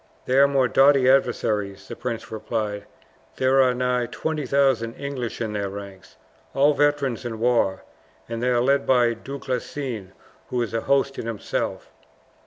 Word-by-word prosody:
"They 130 +2 +3
are 140 - +7
more 135 -2 +2
doughty 135 0 +5
adversaries," 110 -7 +1
the - - -7
prince 120 -2 -5
replied. 110 -2 -3 0.5
"There 130 +1 +3
are 125 -1 +3
nigh 125 -1 0
20,000 135 -7 0
English 135 -4 -5
in 110 -2 -3
their 100 -1 -2
ranks 100 -1 -10 0.4
all 145 +2 +4
veterans 145 -4 +1
in 115 -2 -5
war 115 -5 +1 0.4
and 115 0 -4
they 125 - +1
are 120 -1 +2
led 140 +2 +2
by 120 -2 +4
Du 135 +5 -8
Guesclin, 125 -6 -4 0.4
who 125 - -1
is 115 - -6
a 115 - 0
host 140 +1 +1
in - - -5
himself." 115 -3 -3
125 Hz, 160 wpm, -24 LUFS, 115-135 Hz, 0.5 s, are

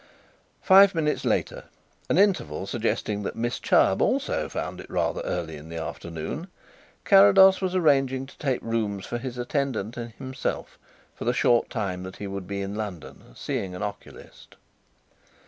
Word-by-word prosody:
Five 195 -1 +7
minutes 150 -2 0
later, - - -1 0.4
an - - +2
interval 175 - +2
suggesting 105 -1 -2
that 100 - -4
Miss 120 +1 -2
Chubb - - +3
also - - 0
found - - -5
it - - -13
rather - - -1
early 80 -3 -3
in 75 +2 -12
the 85 - -6
afternoon, 85 - -6 0.6
Carrados 195 -1 +7
was 185 -1 -1
arranging 135 -6 +2
to 135 - -16
take 135 -4 -1
rooms 105 -4 -2
for 120 - -4
his 125 0 -6
attendant 125 -3 -2
and 120 -1 -6
himself 130 +2 -5 0.3
for - - -8
the 120 - +2
short 120 -1 +2
time 95 -5 -3
that 95 0 -8
he 105 - -7
would 100 -1 -6
be 100 0 -3
in 100 +1 -5
London, 90 -11 -7
seeing 95 -2 -4
an 90 - -5
oculist. 100 -1 -9
115 Hz, 160 wpm, -25 LUFS, 95-140 Hz, 0.6 s, Five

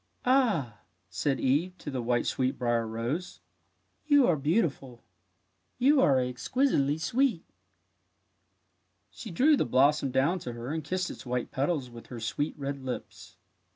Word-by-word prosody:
'' - - -25
Ah/' 220 - +2 0.3
said 135 +9 -1
Eve 165 +8 0
to 145 - -7
the 130 -2 -2
white 120 0 0
sweetbrier 120 -3 0
rose, 120 +11 -4 0.3
" - - -45
you 285 -3 +6
are 175 - +3
beautiful. 145 - -1 0.7
You 275 +2 +4
are 135 - +4
exquisitely 140 - 0
sweet! 230 +2 0 0.9
" 95 -1 -47 0.3
She 220 - -9
drew 275 - +4
the - - +1
blossom 140 +3 +3
down 135 +8 +1
to 125 -7 -6
her 120 +5 -5
and 160 -1 -3
kissed 180 +4 -2
its - - -10
white 125 -1 -3
petals 140 -2 -1
with 115 -1 -12
her 120 - -8
sweet 145 +8 -3
red 140 -1 -5
lips. 130 -1 -7
140 Hz, 155 wpm, -28 LUFS, 125-175 Hz, 0.9 s, you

